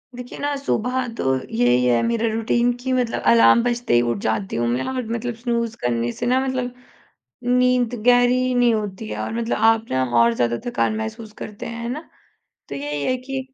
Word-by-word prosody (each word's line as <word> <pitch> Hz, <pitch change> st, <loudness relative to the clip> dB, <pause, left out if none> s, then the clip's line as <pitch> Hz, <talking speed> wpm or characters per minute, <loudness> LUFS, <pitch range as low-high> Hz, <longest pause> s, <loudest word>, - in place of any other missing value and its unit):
देखिए 250 Hz, 0 st, -8 dB
ना, 285 Hz, 0 st, -1 dB
सुबह 255 Hz, -2 st, -1 dB
तो -, -, -2 dB, 0.3 s
यही 120 Hz, +2 st, +3 dB
है 120 Hz, -1 st, +3 dB
मेरा 230 Hz, 0 st, 0 dB
रूटीन 235 Hz, +2 st, +1 dB
कि 260 Hz, +1 st, -2 dB
मतलब 250 Hz, -2 st, 0 dB
अलार्म 115 Hz, -, +6 dB
बजते 240 Hz, -, -1 dB
ही 120 Hz, -, +5 dB
उठ 120 Hz, -, -1 dB
जाती 110 Hz, -3 st, -2 dB
हूँ 120 Hz, 0 st, 0 dB
मैं 120 Hz, +2 st, 0 dB
और 260 Hz, -1 st, -2 dB
मतलब 240 Hz, +1 st, -3 dB
स्नूज़ 235 Hz, -1 st, -2 dB
करने 120 Hz, -1 st, 0 dB
से 240 Hz, -, -5 dB
ना 250 Hz, +2 st, +3 dB
मतलब 255 Hz, -2 st, -2 dB, 0.7 s
नींद 250 Hz, -1 st, +2 dB
गहरी 250 Hz, +1 st, +4 dB
नहीं 245 Hz, -1 st, +4 dB
होती 210 Hz, 0 st, -4 dB
है -, -, -5 dB
और -, -, -4 dB
मतलब 230 Hz, 0 st, -1 dB
आप 225 Hz, 0 st, 0 dB
ना 130 Hz, 0 st, +1 dB, 0.2 s
और 115 Hz, 0 st, +5 dB
ज़्यादा 120 Hz, 0 st, 0 dB
थकान 240 Hz, -2 st, 0 dB
महसूस 220 Hz, 0 st, -6 dB
करते 210 Hz, -1 st, -7 dB
हैं, 230 Hz, 0 st, -6 dB
है 235 Hz, -, -3 dB
ना? 255 Hz, +5 st, -3 dB, 0.7 s
तो -, -, -5 dB
यही 145 Hz, +1 st, -3 dB
है 255 Hz, -, +1 dB
कि, 265 Hz, +1 st, -5 dB
230 Hz, 200 wpm, -22 LUFS, -, 0.7 s, अलार्म